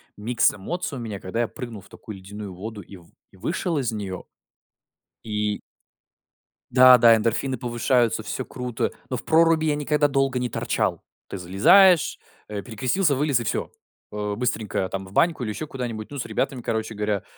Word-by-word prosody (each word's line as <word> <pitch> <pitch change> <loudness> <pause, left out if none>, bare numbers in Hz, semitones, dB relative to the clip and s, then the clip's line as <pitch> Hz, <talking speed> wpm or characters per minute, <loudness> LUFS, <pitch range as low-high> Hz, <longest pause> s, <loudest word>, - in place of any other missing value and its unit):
микс 115 +3 +2
эмоций 140 - -4
у - - -6
меня, 105 -4 -5
когда 105 +6 -3
я 115 - -1
прыгнул 115 -5 -8
в 100 - -19
такую 110 - -10
ледяную 100 +1 -8
воду 105 +3 -7
и 95 - -13
в 85 -2 -16 0.2
и - - -20
вышел 165 - -2
из 125 -5 0
неё. 100 -4 -5 1.0
И 105 -1 -2 1.1
Да, 130 0 +8
да, 115 -1 +7
эндорфины 115 +4 -1
повышаются, 120 -2 +1
всё 125 +5 -4
круто, 125 -2 -3 0.2
но 125 - -2
в 125 - -9
проруби 165 0 +4
я 150 -1 +2
никогда 145 0 +1
долго 135 -2 +1
не 125 - -1
торчал. - - -1 0.3
Ты 100 - -6
залезаешь, 155 - +5 0.3
э, 105 -1 -5
перекрестился, 130 - 0
вылез 140 -3 +1
и - - -3
всё. - - -2 0.4
Э. 105 -1 -3
Быстренько 110 -6 -1
там 95 0 -4
в 95 - -13
баньку 165 - +2
или 110 - -3
еще 155 +8 -5
куда-нибудь, 120 -5 -5
ну, 145 - -6
с 130 - -3
ребятами, 130 -3 -2
короче 110 -1 -3
говоря, 105 -1 -1
115 Hz, 180 wpm, -24 LUFS, 105-135 Hz, 1.1 s, Да